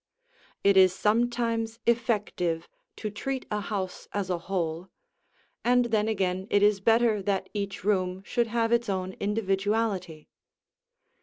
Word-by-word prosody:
It 200 -1 +5
is 185 -1 +6
sometimes 230 +1 0
effective 210 -8 0 0.3
to 215 - -5
treat 260 +5 -4
a 210 - 0
house 195 -3 -4
as 195 -2 -2
a 175 - -1
whole, 170 -1 -3 0.7
and 245 0 +4
then 220 -2 +1
again 190 -3 -1
it 205 0 +3
is 205 -1 +4
better 225 -1 +3
that 195 -1 -1
each 200 -2 -4
room 185 -2 0
should 240 -2 0
have 230 0 0
its 235 -1 +2
own 185 -1 -2
individuality. 200 -4 -1
205 Hz, 135 wpm, -27 LUFS, 190-225 Hz, 0.7 s, is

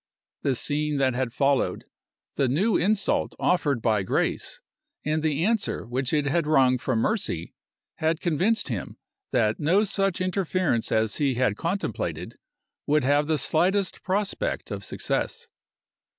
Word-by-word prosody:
The 135 -2 +1
scene 150 +3 0
that 135 -2 +2
had 125 -1 -1
followed, 140 +2 +1 0.5
the 135 - +1
new 185 - +2
insult 200 +3 +1
offered 145 -9 +1
by 110 -3 +2
Grace, 95 - -1 0.5
and 155 +1 0
the 155 +1 0
answer 225 -1 0
which 125 +2 -2
it 150 -2 +1
had 155 +2 +1
wrung 130 -4 +4
from 130 -1 -1
Mercy, 110 - -1 0.4
had 160 0 0
convinced 180 +5 +1
him 110 -7 -5 0.3
that 110 -3 +1
no 175 +8 +3
such 195 -2 0
interference 185 - 0
as 110 -1 +1
he 140 -4 +1
had 125 -4 +1
contemplated 180 - -3 0.5
would 150 0 +3
have 145 +2 +2
the 155 -1 +2
slightest 185 +6 +1
prospect 205 - -2
of - - -4
success. 470 0 -3
150 Hz, 140 wpm, -25 LUFS, 130-185 Hz, 0.5 s, wrung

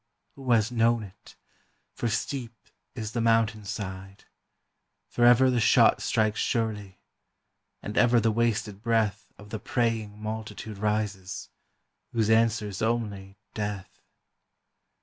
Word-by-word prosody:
who 135 -2 -5
has 115 0 +3
known 115 -1 +2
it? 95 -2 -14 0.6
for 120 - -2
steep 120 +1 -3 0.4
is 110 -2 -5
the 115 - -2
mountain 115 -1 +2
side, 95 -1 -7 0.8
Forever 120 +2 +5
the 125 - +1
shot 110 - +5
strikes 110 -1 +1
surely, 105 -5 -2 0.9
and 105 - -5
ever 120 0 +5
the 115 0 +2
wasted 110 -3 -1
breath 110 -3 0
Of 105 0 -14
the 110 - -4
praying 110 -4 -1
multitude 110 -1 -6
rises, 105 -3 -2 0.6
whose 110 -2 +2
answer 110 -2 +3
is 95 - -7
only 105 -4 -2 0.2
death. 105 -3 -5
110 Hz, 120 wpm, -27 LUFS, 105-115 Hz, 0.9 s, Forever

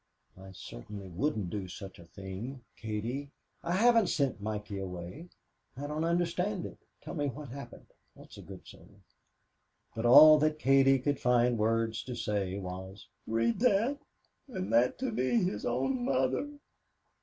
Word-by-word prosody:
"I 95 +1 -12
certainly 95 +8 -9
wouldn't 100 - -2
do 100 -1 -4
such 95 0 -9
a 85 - -13
thing, 100 +9 -7
Katie. 115 +6 -4 0.3
I 170 - -2
haven't 230 +1 +4
sent 140 -10 0
Mikey 105 -1 -4
away. 95 - -7 0.5
I 140 - -5
don't 150 +2 -2
understand 175 +3 0
it. - - -9 0.2
Tell - - -7
me 145 -3 -1
what's 140 0 -7
happened 140 +2 -9 0.3
that's - - -14
a - - -10
good - - -11
soul." - - -15 1.0
But 115 +1 -1
all 155 +5 +10
that 155 +1 +1
Katie 135 -1 +5
could 140 +2 -1
find 125 0 +3
words 115 0 0
to 125 - -5
say 100 -4 -2
was: 95 +1 -8 0.2
"Read 115 +1 +1
that 250 +4 +2 0.5
and 190 -8 -4
that 120 +2 +3
to 260 -1 -2
me, 215 - +1
his 105 - -2
own 130 +1 0
mother." 130 - 0
125 Hz, 155 wpm, -31 LUFS, 105-155 Hz, 1.0 s, all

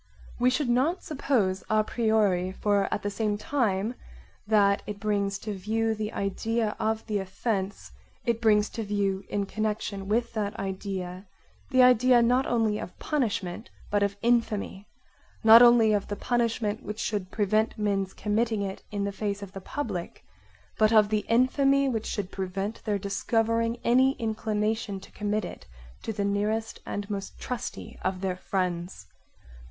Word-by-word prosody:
We 250 +1 +4
should 255 +2 0
not 270 +10 +1
suppose 235 -10 0
it - - -23
a 215 0 +3
priori 210 -5 +1
for 200 0 +1
at - - -2
the 205 - -1
same 210 0 -1
time 215 -3 0 0.5
that 200 -2 +4
it 205 -1 -5
brings 200 -2 0
to 210 +1 -5
view 220 +4 0
the 215 0 -3
idea 215 +2 -1
of 220 0 -1
the 210 -2 -1
offence 195 +1 -3 0.3
it 235 -2 0
brings 210 -2 +4
to 230 - -5
view 200 -2 -1
in 200 -1 -1
connection 210 -1 -3
with 230 +3 0
that 210 -2 -2
idea 190 -1 -4 0.4
the 255 -2 +5
idea 250 0 +6
not 250 +3 +3
only 225 -3 +1
of 180 - -8
punishment 220 - -2 0.2
but 205 0 +2
of 200 0 0
infamy; 225 -4 0 0.6
not 225 +1 +10
only 235 -3 +7
of 205 -1 0
the 205 - -3
punishment 230 -2 0
which 210 +2 -6
should 200 -4 -2
prevent 215 +3 +1
men's 200 -2 0
committing 220 0 0
it 195 -1 -5
in 205 -1 -2
the 200 - -1
face 200 0 -3
of 195 - -9
the 195 - -8
public, 195 -7 -5 0.5
but 215 0 +5
of 215 -2 +5
the 215 -1 0
infamy 275 +3 +3
which 225 -4 -2
should 200 -3 -3
prevent 195 +3 -4
their 210 -2 +1
discovering 225 +4 0
any 260 +3 +4
inclination 220 -3 -2
to - - -15
commit 210 -1 -1
it - - -9 0.3
to - - -3
the 205 -2 -2
nearest 210 +2 -1
and 205 0 -4
most 200 -2 -5
trusty 250 -2 -6
of 185 0 -1
their 190 -2 -1
friends. 180 - -3
210 Hz, 160 wpm, -27 LUFS, 200-230 Hz, 0.6 s, not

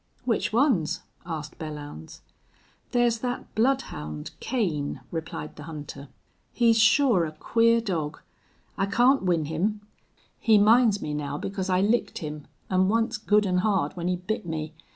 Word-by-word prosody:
"Which 230 -4 0
ones?" 230 - +2 0.3
asked 155 -3 -6
Belllounds. 145 - -8 0.7
"There's 240 -2 +2
that 245 +1 -4
bloodhound, 80 - -1
Kane," 170 - -2
replied 160 -2 -5
the 150 - -8
hunter. 150 -3 -8 0.4
"He's 230 -2 +3
sure 220 - +5
a 155 -1 -4
queer 230 +6 +3
dog. 160 -8 -3 0.6
I 195 - +2
can't 245 +7 +4
win 175 -4 +1
him. 190 +8 -1 0.6
He 220 -3 +5
minds 215 0 +5
me 150 - -3
now 145 -1 -3
because 195 +3 -4
I 185 0 +3
licked 220 +4 +1
him, 150 -2 -6 0.2
an' 185 0 +2
once 225 +1 +1
good 210 -1 +3
an' 180 -1 +1
hard 190 -7 +1
when 175 -1 -3
he 180 - +1
bit 185 +5 -3
me.... 160 -2 -4
190 Hz, 150 wpm, -26 LUFS, 155-225 Hz, 0.7 s, sure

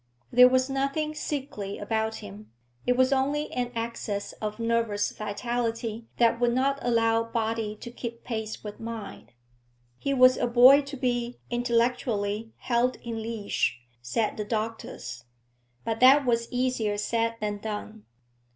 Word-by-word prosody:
There 250 0 +8
was 255 0 +2
nothing 275 +3 -1
sickly 270 -10 -4
about 220 +1 -1
him; 105 +2 -11 0.4
it 250 0 +3
was 260 +1 +4
only 285 +3 0
an 245 -1 -2
excess 230 -3 -3
of 215 -1 -3
nervous 230 -3 0
vitality 230 +1 -3
that 235 -1 +3
would 240 -1 +2
not 275 +2 +1
allow 230 -1 +2
body 225 -2 -2
to 240 - -7
keep 235 -1 -7
pace 220 -2 -4
with 210 -1 -7
mind. 225 - -7 0.7
He 275 - -1
was 255 -1 +6
a 245 - +1
boy 250 +4 +8
to 280 0 -8
be, 245 -1 -1
intellectually, 230 -3 0
held 245 +1 +1
in 230 -1 -4
leash, 220 - -1 0.2
said 210 - -1
the 210 - -2
doctors. 215 - -4 0.6
But 225 0 -1
that 270 +2 +7
was 235 -1 +1
easier 245 -5 0
said 230 +2 0
than 210 -1 -2
done. 215 0 -6
230 Hz, 140 wpm, -27 LUFS, 220-250 Hz, 0.7 s, There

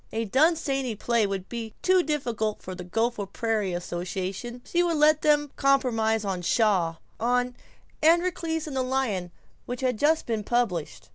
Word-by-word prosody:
A 225 +1 -2
Dunsany 270 - +1
play 230 0 +1
would 195 -1 -4
be 230 -2 -6
too 370 0 +5
difficult 235 -9 -2
for 185 - -6
the 180 0 -7
Gopher 225 +2 -1
Prairie 215 -1 -1
association. 185 +7 -4
She 345 - +1
would 340 -2 +1
let 305 0 +5
them 295 -1 +3
compromise 225 -6 +2
on 190 -2 -2
Shaw 185 -4 +2 0.2
on 245 +1 +1 0.5
"Androcles 330 -1 +2
and 295 -3 -6
the 260 - +1
Lion," 255 -9 -1 0.4
which 245 +1 -4
had 250 -4 0
just 310 +2 +3
been 225 -3 -2
published. 205 -9 -1
240 Hz, 155 wpm, -26 LUFS, 205-285 Hz, 0.5 s, too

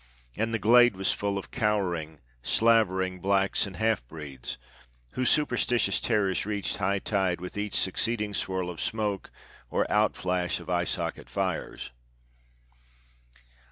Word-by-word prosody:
And 115 +1 -1
the 115 - +1
glade 120 +1 +6
was 95 0 +1
full 100 -1 -2
of 100 - -7
cowering, 90 - -1 0.2
slavering 95 - +2
blacks 100 +2 +1
and 95 - -9
half 110 - +1
breeds, 70 -3 -7 0.5
whose 130 - 0
superstitious 125 -4 +2
terrors 105 -5 +1
reached 105 -1 -2
high 100 0 +1
tide 95 -3 0
with 90 +1 -7
each 105 0 -3
succeeding 105 +2 0
swirl 95 -1 -2
of 85 - -8
smoke 105 -3 -2 0.4
or - - +1
outflash 90 -4 +1
of - - -7
eye 90 0 +1
socket 85 -3 -3
fires. - - -3
100 Hz, 130 wpm, -28 LUFS, 90-110 Hz, 0.5 s, glade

